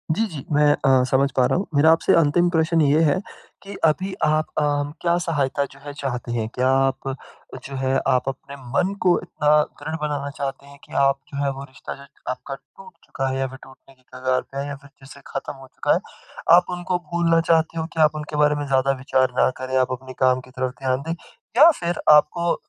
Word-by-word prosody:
जी, 225 - +1
जी। 140 -4 -7
मैं 150 +1 +4 0.2
अ, 130 -1 +5
समझ 135 +2 +3
पा 125 - +5
रहा - - +1
हूँ। 195 - -1
मेरा 155 +3 +6
आपसे 165 - +3
अंतिम 170 +2 +3
प्रशन 160 -1 +2
ये 145 +2 +4
है 160 +4 +2 0.4
कि, 200 0 -9
अभी 185 +5 +1
आप 155 0 +1
अ, - - +3 0.4
क्या 170 0 +2
सहायता 145 -5 -1
जो 140 - -16
है 145 - -6
चाहते 125 -4 -4
हैं? 115 -2 -1
क्या 130 +1 +2
आप 135 0 0 0.5
जो 135 - -7
है 130 0 0
आप 130 0 +2
अपने 135 +1 -8 0.2
मन 185 +6 +2
को 180 -1 +4
इतना 150 -4 -1 0.3
दृढ़ 155 - -4
बनाना 145 -2 -2
चाहते 140 0 -4
हैं 140 0 -15
कि - - -15
आप 135 0 +3
जो 140 0 -2
है 140 - +1
वो 135 0 -7
रिश्ता 135 -1 -9
जो 140 0 -14 0.3
आपका 135 +1 -6
टूट 475 - -17
चुका 135 - -3
है 130 - -2
या 135 - 0
फिर 130 +1 -10
टूटने 135 0 -17
के 130 - -31
कगार 130 0 0
पे 135 - -7
है 140 +1 -3
या 140 - -5
फिर 140 +1 -17
जैसे 135 +1 -13
ख़त्म 135 - -5
हो 135 -1 -14
चुका - - 0
है। - - +2 0.6
आप 180 - +5
उनको 175 0 -2
भूलना 165 -1 +3
चाहते 165 0 +2
हो 160 - -2
कि 165 - -5
आप 155 0 +4
उनके 150 0 -6
बारे 150 0 +3
में 145 - -3
ज़्यादा 135 0 +2
विचार 130 -1 +2
ना - - +5
करें 130 0 -1
आप 130 0 +2
अपने 130 0 -11
काम 130 0 +4
की 130 - -17
तरफ 130 0 -3
ध्यान 130 0 0
दें, 165 - -1 0.4
या 310 +5 +9
फिर 175 0 -2
आपको 160 +3 +4
140 Hz, 225 wpm, -22 LUFS, 135-160 Hz, 0.6 s, या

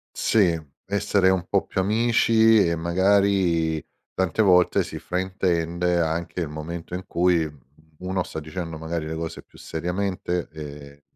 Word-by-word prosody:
Sì, 90 -7 +2 0.3
essere 100 -1 +2
un 95 -1 0
po' 100 - +1
più 95 - -2
amici, 110 0 +4
e 85 - +1
magari 85 -2 +2 0.3
tante 95 +3 +1
volte 90 -3 +4
si - - -7
fraintende 90 -2 -1
anche 85 +2 -2
il 80 - -2
momento 80 +3 -6
in 90 - -5
cui 85 -2 +2 0.5
uno 95 0 -2
sta 80 - -6
dicendo 80 0 -6
magari 80 0 -4
le 80 - -4
cose 80 0 -5
più - - -20
seriamente, 90 +1 -3
ehm, 70 -2 -10
90 Hz, 140 wpm, -24 LUFS, 80-95 Hz, 0.5 s, amici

